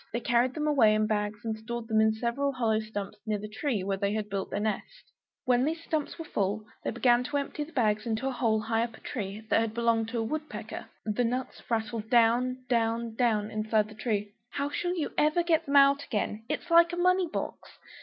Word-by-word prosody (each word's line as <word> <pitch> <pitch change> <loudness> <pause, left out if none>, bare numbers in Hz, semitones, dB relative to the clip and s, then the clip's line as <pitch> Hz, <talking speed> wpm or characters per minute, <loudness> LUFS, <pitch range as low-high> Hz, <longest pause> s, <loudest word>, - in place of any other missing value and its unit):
They 235 - -1
carried 240 +2 +2
them 305 -1 -1
away 245 -8 +5
in 215 0 +2
bags, 210 0 -2
and 220 -1 -1
stored 230 +1 -6
them 220 -1 +3
in 220 0 +4
several 240 +5 0
hollow 225 -4 +1
stumps 210 -1 -6
near 215 -1 +1
the 210 +1 -6
tree 220 -1 -2
where 195 0 -1
they 200 +1 0
had 215 -1 -2
built 195 -1 -2
their 200 - -2
nest. 220 - -4 0.3
When 250 0 +3
these 325 +3 -1
stumps 310 -3 -2
were 330 - -6
full, 205 -3 -1 0.2
they - - -1
began 240 +1 +3
to 290 +2 -1
empty 285 +1 -3
the 320 - -15
bags 215 -5 +1
into 225 +4 -1
a - - 0
hole 230 -3 +1
high 225 +1 0
up 230 -2 -5
a - - -18
tree, 210 -1 -5
that - - +5
had 225 -1 -2
belonged 230 -1 +2
to 235 - -3
a 225 - 0
wood 305 +7 -3
pecker; - - -7 0.2
the 215 +3 0
nuts 250 +2 -2
rattled 220 -1 -2
down 250 +2 +3
down 230 -1 0
down 220 -3 +1
inside. 215 0 0 0.5
"How 280 +1 -2
shall 355 +4 -1
you 305 - -2
ever 310 +3 +3
get 330 -2 +1
them 280 - 0
out 280 0 +6
again? 210 +1 -3
It 300 - -1
is 340 - -14
like 340 +1 +6
a - - -2
money 365 +1 +3
box!" 320 - -6
230 Hz, 225 wpm, -29 LUFS, 215-280 Hz, 0.5 s, out